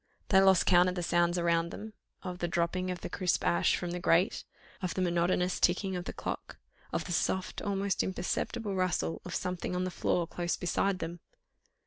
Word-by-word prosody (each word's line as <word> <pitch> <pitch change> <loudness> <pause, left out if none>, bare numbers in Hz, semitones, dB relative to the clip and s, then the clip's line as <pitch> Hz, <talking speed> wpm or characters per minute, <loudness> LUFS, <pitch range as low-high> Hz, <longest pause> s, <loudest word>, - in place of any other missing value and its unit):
They 190 -1 +6
lost 190 -2 +5
count 180 0 +5
of 180 - -4
the 175 - -2
sounds 175 +1 +2
around 170 -1 +2
them, 215 +4 -8 0.3
of 180 -1 -5
the 175 - 0
dropping 175 +2 0
of 180 -1 -4
crisp 180 - 0
ash 85 +1 +3
from 175 - -3
the 180 - -3
grate, 180 +3 +2 0.4
of 185 -2 -2
the 185 - 0
monotonous 180 +1 +1
ticking 185 +2 +2
of 175 0 -4
the - - -4
clock, - - -5 0.3
of - - -2
the 180 - -6
soft, 185 +2 -1
almost 200 -1 0
imperceptible 200 +3 -2
rustle 175 - 0
of - - -5
something 180 0 -2
on 180 - 0
the 185 - -2
floor 175 0 0
close 175 +1 -2
beside 190 +2 0
them. 170 0 -5
180 Hz, 190 wpm, -31 LUFS, 175-185 Hz, 0.4 s, They